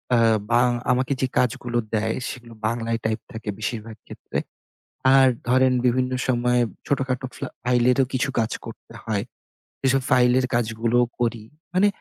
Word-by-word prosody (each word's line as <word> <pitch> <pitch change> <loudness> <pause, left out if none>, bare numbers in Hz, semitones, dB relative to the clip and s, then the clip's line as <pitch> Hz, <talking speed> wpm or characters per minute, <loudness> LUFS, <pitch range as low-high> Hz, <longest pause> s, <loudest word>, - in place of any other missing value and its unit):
আ - - +4 0.3
বাং 120 +1 +4 0.2
আমাকে 130 +2 +1
যে 130 - +2
কাজগুলো 125 -1 0 0.2
দেয় 110 +1 0
সেগুলো 120 -2 -9
বাংলায় 115 0 -1
টাইপ 110 0 0
থাকে 110 -1 -6
বেশিরভাগ 110 0 -4
ক্ষেত্রে। - - -6 0.8
আর 135 -1 +7 0.2
ধরেন 130 0 +4
বিভিন্ন 125 +1 +1 0.2
সময় 125 -1 +2 0.3
ছোটখাটো 135 -2 -1
ফ্লা - - -5 0.2
ফাইলেরও 125 +1 +3
কিছু 130 +1 0
কাজ 110 -1 0
করতে - - -11
হয়। 105 -2 -1 0.6
এসব 135 +1 +3
ফাইলের 125 0 +4
কাজগুলোও 115 +1 +1
করি। 115 -2 -1 0.3
মানে 195 +3 +4
125 Hz, 140 wpm, -23 LUFS, 115-130 Hz, 0.8 s, আর